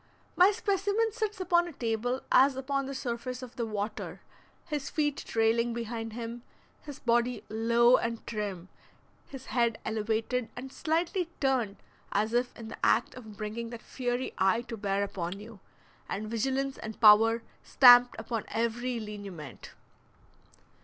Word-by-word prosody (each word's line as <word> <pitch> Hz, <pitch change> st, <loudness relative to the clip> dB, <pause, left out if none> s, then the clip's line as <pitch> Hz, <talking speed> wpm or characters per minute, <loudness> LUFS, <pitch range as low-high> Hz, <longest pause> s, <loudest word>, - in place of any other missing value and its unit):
My 365 Hz, +2 st, +7 dB
specimen 405 Hz, +2 st, 0 dB
sits 430 Hz, -2 st, -3 dB
upon 350 Hz, -1 st, +2 dB
a 345 Hz, -, -8 dB
table 245 Hz, +1 st, -1 dB
as 265 Hz, +1 st, +6 dB
upon 275 Hz, +1 st, -2 dB
the 275 Hz, -, -5 dB
surface 250 Hz, 0 st, -4 dB
of 245 Hz, -, -10 dB
the 235 Hz, -3 st, -2 dB
water, 215 Hz, 0 st, -4 dB, 0.5 s
his 295 Hz, -4 st, -3 dB
feet 295 Hz, -2 st, 0 dB
trailing 230 Hz, +1 st, +1 dB
behind 225 Hz, -1 st, -4 dB
him, 235 Hz, +1 st, -6 dB, 0.4 s
his 290 Hz, -3 st, -9 dB
body 240 Hz, +1 st, +1 dB
low 235 Hz, +3 st, +4 dB
and 230 Hz, -1 st, -3 dB
trim, 200 Hz, -5 st, -4 dB, 0.6 s
his 270 Hz, -1 st, -10 dB
head 235 Hz, -2 st, +2 dB
elevated 220 Hz, +2 st, -1 dB
and 260 Hz, +2 st, -8 dB
slightly 335 Hz, +2 st, -1 dB
turned 255 Hz, -7 st, +1 dB, 0.4 s
as 215 Hz, +3 st, 0 dB
if 245 Hz, +1 st, +1 dB
in 225 Hz, -1 st, -8 dB
the -, -, -10 dB
act -, -, +3 dB
of 220 Hz, -5 st, -11 dB
bringing 225 Hz, +2 st, -4 dB
that 235 Hz, -1 st, -9 dB
fiery 245 Hz, 0 st, -3 dB
eye 195 Hz, +5 st, +3 dB
to 235 Hz, -, -6 dB
bear 200 Hz, -1 st, -1 dB
upon 190 Hz, -1 st, -4 dB
you, 215 Hz, 0 st, -11 dB, 0.5 s
and 215 Hz, +2 st, -4 dB
vigilance 270 Hz, +4 st, -1 dB
and 220 Hz, 0 st, -7 dB
power 225 Hz, +1 st, +6 dB, 0.2 s
stamped 245 Hz, -1 st, +7 dB
upon 225 Hz, -1 st, -4 dB
every 235 Hz, +2 st, -1 dB
lineament. 200 Hz, -, -8 dB
235 Hz, 145 wpm, -29 LUFS, 220-265 Hz, 0.6 s, My